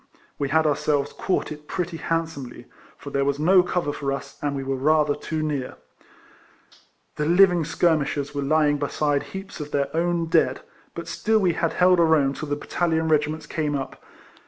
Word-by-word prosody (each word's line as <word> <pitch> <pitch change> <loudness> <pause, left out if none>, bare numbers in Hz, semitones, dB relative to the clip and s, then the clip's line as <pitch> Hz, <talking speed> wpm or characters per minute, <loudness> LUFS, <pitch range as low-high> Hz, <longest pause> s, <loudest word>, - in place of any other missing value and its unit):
We 140 - -1
had 160 +2 +3
ourselves 150 -1 0
caught 185 - -1
it 150 0 -9
pretty 175 -3 -3
hand 165 0 0
somely; 130 -6 -9 0.3
for 140 - -9
there 140 0 +1
was 140 0 0
no 180 +5 +5
cover 180 -4 -2
for 140 -1 -3
us, 140 0 -5
and 145 -1 -1
we 135 - -3
were 135 0 -2
rather 150 +2 +2
too 155 +2 -4
near. 145 -4 -3 1.4
The 150 - -1
living 175 -1 +5
skir 165 +1 +2
mishers 145 0 -3
were 140 - -2
lying 145 0 +2
beside 145 0 0
heaps 190 +5 -8
of 150 -1 -6
their 140 +1 -1
own 170 0 +1
dead; 165 - +2 0.3
but - - -6
still 220 0 +1
we 185 -5 +2
had 165 0 -1
held 180 0 +4
our 160 -1 +5
own 140 -3 +2
till 150 +1 -6
the 145 - 0
battalion 160 +1 -1
regiments 155 0 +1
came 150 -1 -2
up. 135 -1 -6
150 Hz, 190 wpm, -24 LUFS, 145-165 Hz, 1.4 s, no